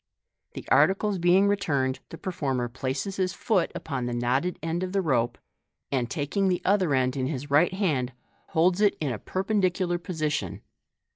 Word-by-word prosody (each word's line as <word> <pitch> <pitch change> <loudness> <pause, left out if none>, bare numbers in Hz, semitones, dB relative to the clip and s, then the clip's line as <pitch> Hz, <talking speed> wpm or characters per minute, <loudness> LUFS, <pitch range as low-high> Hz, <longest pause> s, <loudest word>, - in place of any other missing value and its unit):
The - - -8
articles 195 0 +3
being 180 +3 +4
returned, 140 -10 0
the 165 - -8
performer 135 -10 -2
places 130 +10 -3
his 185 -2 0
foot 195 -7 +1
upon 130 -6 -3
the 120 - -2
knotted 130 +9 0
end 165 +2 -1
of 185 0 -3
the 195 - +2
rope, 120 -6 +1 0.5
and 125 -3 0
taking 170 +6 0
the 180 -1 +1
other 185 -7 +3
end 130 0 +1
in 130 -1 -1
his 140 0 -5
right 150 +5 +5
hand, 155 -11 0 0.4
holds 175 +4 +2
it 205 -1 +3
in 145 -4 -1
a 110 - -4
perpendicular 185 -2 0
position. 155 -4 -3
165 Hz, 165 wpm, -27 LUFS, 130-185 Hz, 0.5 s, right